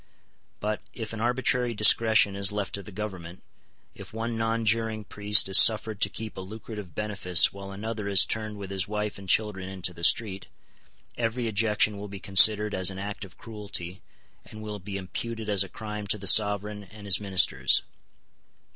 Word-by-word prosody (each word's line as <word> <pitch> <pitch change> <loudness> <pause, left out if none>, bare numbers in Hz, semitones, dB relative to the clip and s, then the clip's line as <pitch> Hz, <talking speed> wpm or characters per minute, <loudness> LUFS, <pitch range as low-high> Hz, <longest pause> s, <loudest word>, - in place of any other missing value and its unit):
But, 105 0 -3
if 110 -2 -6
an 110 - -6
arbitrary 125 0 0
discretion 105 -1 +4
is 100 0 0
left 105 -2 -4
to 100 - -4
the 100 - -12
Government, 95 -4 -8 0.5
if 100 -1 -12
one 115 +1 -4
nonjuring 115 -1 -1
priest 105 0 +4
is 95 0 +6
suffered 110 -2 +2
to 100 - +4
keep 110 +1 -7
a - - -5
lucrative 105 -2 -10
benefice 100 -4 +1
while 100 0 -9
another 105 +1 -6
is 100 -4 +5
turned 110 -1 -4
with 100 -1 -8
his 95 -2 -2
wife 105 -1 -4
and 95 -1 -11
children 95 -3 0
into 95 -1 -3
the 85 0 -13
street, 100 0 +1 0.7
every 115 +1 -2
ejection 105 -1 0
will 105 - -7
be 100 -1 -9
considered 105 +3 +5
as 95 0 0
an 95 - -8
act 100 +2 -6
of 95 - -13
cruelty, 100 -4 -7 0.4
and 110 0 -12
will 105 -1 -7
be 100 +1 -7
imputed 110 +4 -6
as 100 -2 +3
a 95 - -10
crime 105 -1 -7
to 105 - +1
the 100 - -10
sovereign 105 0 +3
and 105 +2 -14
his 100 - +3
ministers. 95 -3 +3
105 Hz, 180 wpm, -26 LUFS, 95-110 Hz, 0.7 s, is